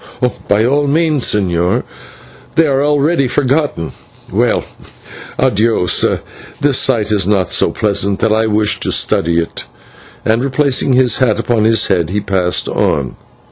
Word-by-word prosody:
"By 105 +2 +2
all 145 +3 +1
means, 155 -2 +1
señor; 90 -4 0 0.7
they 165 - +4
are 140 -2 +1
already 145 0 +1
forgotten. 135 - -1 0.4
Well, - - +1 0.7
/adios/, 110 -3 +1 0.4
this 140 -2 +2
sight 115 -5 +1
is 100 -3 +2
not 95 -4 0
so - - +2
pleasant 100 -1 0
that 115 -1 +2
I 110 0 +1
wish 105 0 +1
to - - 0
study 85 +1 +1
it," 85 0 -3 0.6
and 115 +3 +1
replacing 140 -1 +1
his 125 -2 +3
hat 115 -6 +2
upon 115 -1 0
his 110 -1 +3
head, 85 -4 +1
he 100 +3 -1
passed 95 -3 -1
on. 70 -4 -1
110 Hz, 140 wpm, -14 LUFS, 100-135 Hz, 0.7 s, they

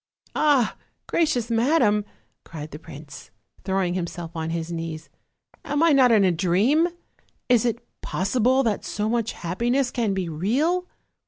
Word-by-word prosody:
"Ah! 285 -7 +2 0.3
gracious 275 -9 0
madam," 230 -4 +3 0.4
cried 155 -1 -8
the 150 - -8
prince, 150 -3 -11 0.3
throwing 190 -2 0
himself 170 -2 -4
on 160 0 -3
his 165 0 -3
knees, 165 -1 -5 0.5
"am 290 +2 0
I 335 - +5
not 260 -4 +5
in 215 -3 +5
a 185 - +4
dream? 195 - +2 0.6
is 245 -2 +4
it 235 0 -2 0.2
possi 195 +7 -1
ble 260 +4 +4
that 220 -4 -1
so 210 +1 -2
much 230 0 0
happiness 240 +9 -1
can 225 -6 0
be 185 -2 -2
real?" 270 - 0
210 Hz, 150 wpm, -24 LUFS, 170-250 Hz, 0.6 s, I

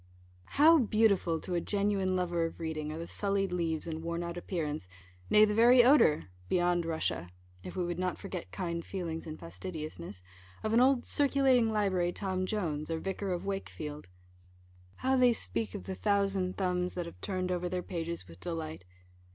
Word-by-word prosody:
How 320 +3 +8
beautiful 210 - +2
to 180 - -5
a 170 - +1
genuine 200 -2 0
lover 175 -2 0
of 165 - -11
reading 155 -2 -3
are 155 - -5
the 165 - -5
sullied 195 0 -1
leaves, 165 -3 -1
and 160 -1 -4
worn 170 +1 -3
out 170 0 -4
appearance, 155 - -3 0.4
nay, 210 0 +7
the 210 - 0
very 240 +3 +7
odour 250 - +5 0.3
(beyond 175 -1 +2
Russia), 160 - -2 0.3
if - - -8
we 180 -2 0
would 175 0 -3
not 185 -1 -1
forget 190 -4 -6
kind 170 -3 -3
feelings 165 -4 -4
in 155 0 -6
fastidiousness, 95 - -7 0.4
of 215 - 0
an 230 - +6
old 260 -1 +4
"Circulating 265 -5 +3
Library" 190 -5 +1
Tom 185 -1 -2
Jones, 160 -8 -2
or 165 - -1
Vicar 195 +3 -3
of 180 +1 -3
Wakefield! 150 - -5 0.9
How 265 +1 +1
they 250 -2 +5
speak 105 - -3
of - - -5
the 95 +1 -5
thousand 195 - 0
thumbs, 180 -1 0
that 175 -1 -2
have 170 - -11
turned 185 -2 -2
over 180 0 -1
their 180 0 -2
pages 170 - -4
with 85 0 -13
delight! 160 - -5
180 Hz, 175 wpm, -31 LUFS, 160-200 Hz, 0.9 s, How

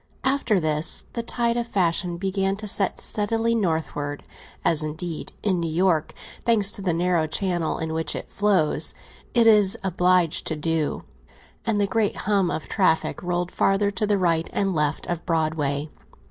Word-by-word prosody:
After 265 -6 +1
this, 155 -1 0
the 235 - -2
tide 235 0 -1
of 240 0 -2
fashion 175 -3 0
began 195 +1 -1
to 210 +1 -7
set 195 -1 +1
steadily 225 +2 0
northward, 160 -7 -2 0.4
as, 160 -2 +4
indeed, 155 +2 -5
in 190 -4 +1
New 165 -1 -2
York, 170 -2 +1 0.3
thanks 210 -4 +5
to 200 - -7
the 185 -2 0
narrow 170 -1 +1
channel 175 0 -1
in 160 0 -3
which 160 -2 -2
it - - -6
flows, 195 -7 +2 0.4
it 235 -1 +5
is 210 -1 +5
obliged 180 -2 +2
to 160 - -1
do, 155 0 -1 0.6
and 215 -2 +1
the 205 - +3
great 210 +1 0
hum 195 -3 +2
of 155 - -4
traffic 185 -6 +1
rolled 175 0 -2
farther 200 +1 +1
to 205 +2 -1
the 205 -1 +2
right 170 -3 +1
and 195 -1 0
left 150 -2 -1
of 175 -1 -3
Broadway. 155 -3 -1
180 Hz, 165 wpm, -24 LUFS, 160-205 Hz, 0.6 s, thanks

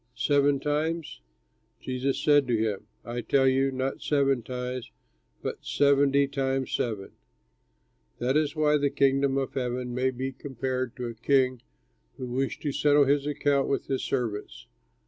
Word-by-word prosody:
Seven 140 +2 +2
times?" 150 - -2 0.6
Jesus 130 +1 -2
said 145 -3 +4
to 120 -2 +2
him, 105 -1 -2 0.2
"I 120 +1 -4
tell 135 +2 +3
you, 135 +1 +2
not 130 +1 -3
seven 140 -3 +2
times 125 +1 -5 0.5
but - - -4
seventy 140 0 +3
times 135 -1 -1
seven. 105 -5 -2 1.1
"That 130 +3 0
is 150 0 +1
why 150 -1 +3
the 145 -1 +1
Kingdom 135 -1 +2
of 135 -2 -2
Heaven 125 -1 -2
may 130 +1 +1
be 130 +1 -4
compared 130 -2 -4
to 125 - -5
a 120 - -4
king 130 +1 +1 0.6
who 130 - -5
wished 130 +2 -2
to 145 - 0
settle 145 +1 +4
his 140 +1 +2
accounts 145 -1 +1
with 140 - -1
his 135 -1 -2
servants. 105 - -3
135 Hz, 150 wpm, -27 LUFS, 125-140 Hz, 1.1 s, said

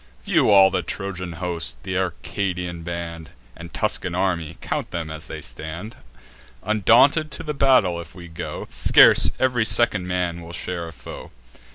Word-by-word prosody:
View - - +2
all 95 -2 +7
the 95 -1 0
Trojan 90 -1 -5
host, 85 -8 -3
th' - - -9
Arcadian 90 -1 -3
band, 85 -1 -6 0.3
And 85 0 -10
Tuscan 90 +3 -2
army; 90 -4 -1
count - - -4
'em 80 -2 -4
as 80 0 -5
they - - -7
stand: 85 +8 -7 0.7
Undaunted 120 - +4
to 155 - -7
the 150 -1 -3
battle 130 -12 +3
if 80 - -14
we 90 -1 -10
go, 80 - -6
Scarce - - +6
ev'ry 125 -3 +2
second 110 -5 +3
man 90 -2 -2
will 85 +1 -10
share 85 -1 -4
a - - -9
foe. - - -10
90 Hz, 160 wpm, -22 LUFS, 85-100 Hz, 0.7 s, all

